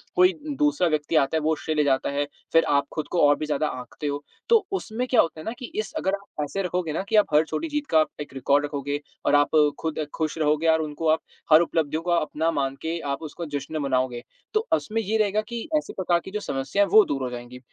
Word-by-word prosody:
कोई 365 +1 +5 0.3
दूसरा 295 -11 +3
व्यक्ति 155 0 -1
आता 155 +1 +3
है - - 0
वो 155 +1 +1
श्रेय 155 +1 -3
ले 150 - +3
जाता 135 -2 +1
है, 145 +1 0 0.3
फिर 165 - +6
आप 140 -1 +3
खुद 155 - -3
को 175 - +1
और 145 - +5
भी 155 - -3
ज़्यादा 150 0 0
आँकते 135 +4 -7
हो 145 0 -3 0.3
तो 455 -4 +5
उसमें 250 - -3
क्या 250 - +5
होता 165 -1 -3
है 155 - -9
ना - - -2
कि 250 - -5
इस 435 - -3
अगर 190 -10 0
आप 200 -6 -7
ऐसे 195 +7 -3
रखोगे 180 -3 -2
ना 160 - -1
कि 225 - +1
आप 210 - +6
हर 150 +1 +6
छोटी 330 - -3
जीत 295 -1 -2
का 155 -1 +5 0.2
एक 145 - -8
रिकॉर्ड 140 +2 +2
रखोगे 145 0 -3 0.3
और - - +4
आप 145 0 +4 0.3
खुद 160 -1 -3 0.2
खुश 160 0 -2
रहोगे 155 +1 +1
और 160 0 +4
उनको 155 +1 -3
आप 160 +1 +4 0.3
हर 155 +2 +9
उपलब्धियों 160 -2 0
को 175 - -1
अपना 160 -1 +1
मान 135 -3 -1
के 165 +1 -2
आप 140 - -2
उसको 165 +2 -6
जश्न 145 +1 -4
मनाओगे, 130 -3 0 0.3
तो 435 - +4
उसमें 225 +1 0
ये 220 +1 0
रहेगा 215 0 +2
कि 235 0 -4 0.2
ऐसी 300 - -4
प्रकार 175 -2 +1
की - - -8
जो 210 - -2
समस्या 135 +1 -1
है - - 0
वो 215 +3 +8
दूर 140 -1 -2
हो 125 - -2
जाएँगी। 120 +1 -8
155 Hz, 250 wpm, -25 LUFS, 145-195 Hz, 0.3 s, हर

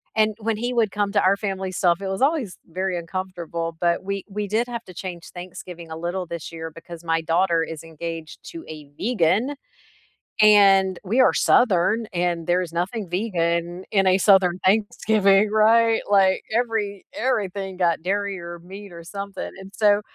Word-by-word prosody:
and 215 -1 +2
when 220 0 -1
he 240 +3 -2
would 225 -5 +2
come 205 -1 -1
to 200 - +3
our 195 +2 +4
family 190 -2 -3
stuff, 175 0 +1
it 195 - -3
was 190 +3 -3
always 275 - +1
very 185 +1 -2
uncomfortable, 170 -2 -5
but 170 0 +1
we 200 0 -3
we 205 +1 -3
did 220 +4 0
have 235 -1 -5
to 185 - -12
change 175 -1 -7
Thanksgiving 175 -1 -9
a 160 - -5
little 175 +3 -3
this 170 0 -6
year 165 0 -7
because 165 +1 -11
my 165 -1 0
daughter 165 0 +2
is 160 0 -7
engaged 165 0 -7
to 330 -1 -8
a 150 -2 -9
vegan 220 - +1 0.9
and 195 -3 +6
we 220 +7 0
are - - +5
Southern 220 0 +3
and 175 -1 -1
there's 175 -1 +1
nothing 185 +3 -3
vegan 175 -2 -1
in 195 -2 +3
a 185 0 +5
Southern 185 -3 +4
Thanksgiving, 205 0 +3
right? 225 +1 +4
Like 195 -2 +4
every 220 -5 -1
everything 200 -6 -2
got 170 -3 +1
dairy 200 +1 -1
or 170 0 -8
meat 190 +2 -11
or 170 0 -10
something, 200 +3 -6
and 190 0 -11
so, 205 -1 +4
190 Hz, 175 wpm, -23 LUFS, 170-210 Hz, 0.9 s, and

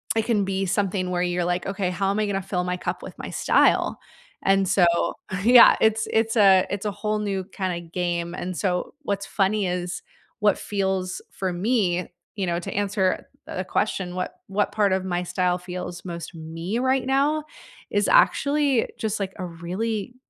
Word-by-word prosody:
it 225 -1 +1
can 215 -4 +1
be 195 0 -1
something 190 -1 0
where 175 - 0
you're 175 0 0
like, 175 0 -1
"Okay, 195 -2 -1
how 195 +1 0
am 200 - -1
I 215 - +2
gonna 195 -1 -1
fill 180 -1 -2
my 180 0 -1
cup - - -4
with - - -9
my - - -6
style," - - +2 0.4
and 195 0 +3
so, 185 -1 +4 0.6
yeah, 240 +1 +8
it's 220 0 +3
it's 225 +1 +1
a 195 -3 +6
it's 200 +1 -3
a - - -1
whole 210 +1 -2
new 195 -2 -2
kinda 185 -2 -3
game, 170 0 -3
and 180 -1 -4
so 180 -3 -1
what's 200 -4 -2
funny 200 0 +1
is 180 0 -3 0.4
what 210 -2 +3
feels 190 -2 -2
for 185 -2 -3
me, 185 -3 +1 0.3
you 195 - -1
know, 170 - 0
to 175 - -6
answer 195 -2 0 0.2
the 185 - -3
question, 185 -2 -1
what 185 - -3
what 200 +1 0
part 205 -3 +2
of 190 0 -1
my 175 -1 -1
style 180 0 0
feels 180 -1 -6
most 170 -1 -6
me 165 +7 -4
right 260 0 +1
now, 285 +3 +2 0.5
is 205 0 +2
actually 280 -3 +3
just, 220 -1 -2
like, 195 -1 -3
a 185 - -4
really, 195 +7 -4
190 Hz, 185 wpm, -24 LUFS, 180-210 Hz, 0.6 s, yeah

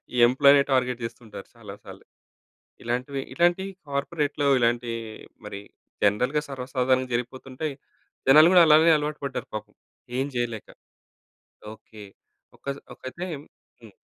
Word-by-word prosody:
ఈ - - -2
employee 140 +2 +5
target 125 -2 +1
జేస్తుంటారు 115 -3 -8
చాలా 105 -4 -10
సార్లు. - - -13 0.8
ఇలాంటివి 125 +3 -2
ఇట్లాంటియి 175 +3 +2 0.2
కార్పొరేట్‌లో 145 0 -1
ఇలాంటి 120 0 +1 0.5
మరి 100 -1 -7 0.4
జనరల్‌గా 125 +9 +2
సర్వసాధారణంగా 130 -1 -1
జరిగిపోతుంటాయి. 130 +4 -4 0.5
జనాలు 155 +4 +8
గూడా 180 -2 +8
అలానే 160 +2 +6
అలవాటు 150 0 -4
పడ్డారు - - -5
పాపం. 110 - -7 0.4
ఏం 135 - 0
జేయలేక. 120 -3 -3 1.1
ఓకే. 110 0 -15 0.5
ఒకజ 140 0 -5 0.2
ఒకైతే 170 +8 -7 0.6
హ్మ్. 110 -4 -15
130 Hz, 110 wpm, -25 LUFS, 120-145 Hz, 1.1 s, జనాలు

